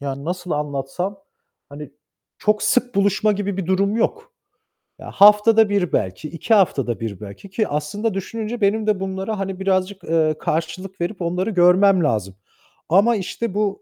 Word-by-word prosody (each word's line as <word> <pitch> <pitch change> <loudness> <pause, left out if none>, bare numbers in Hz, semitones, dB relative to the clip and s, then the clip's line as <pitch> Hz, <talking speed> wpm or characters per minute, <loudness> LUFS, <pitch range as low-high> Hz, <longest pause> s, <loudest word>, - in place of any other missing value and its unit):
yani, 140 0 -5
nasıl 180 +1 -5
anlatsam, 150 +6 -3 0.5
hani 145 0 -10 0.5
çok 210 0 +1
sık 250 -2 +1
buluşma 200 +2 +2
gibi 200 -1 -3
bir 190 -4 -3
durum 200 +3 +1
yok. 455 - -2 0.7
Ya, - - -9
haftada 210 +1 +6
1 200 -4 0
belki, 95 +11 -2
2 170 +8 -1
haftada 135 - +2
1 110 -4 -5
belki 105 - -11
ki 215 +2 -1
aslında 185 +9 -2
düşününce 220 +4 -5
benim 215 +2 +1
de 205 -3 +1
bunlara, 195 +2 -4
hani 195 -1 -4
birazcık, 190 0 -1
eee, 155 -1 +1
karşılık 170 +4 -4
verip 180 +2 -3
onları 180 +4 -1
görmem 185 0 +4
lazım 105 -9 -1 0.5
ama 205 +7 +4
işte 210 +2 -4
bu 205 -1 -1
190 Hz, 155 wpm, -21 LUFS, 160-210 Hz, 0.7 s, haftada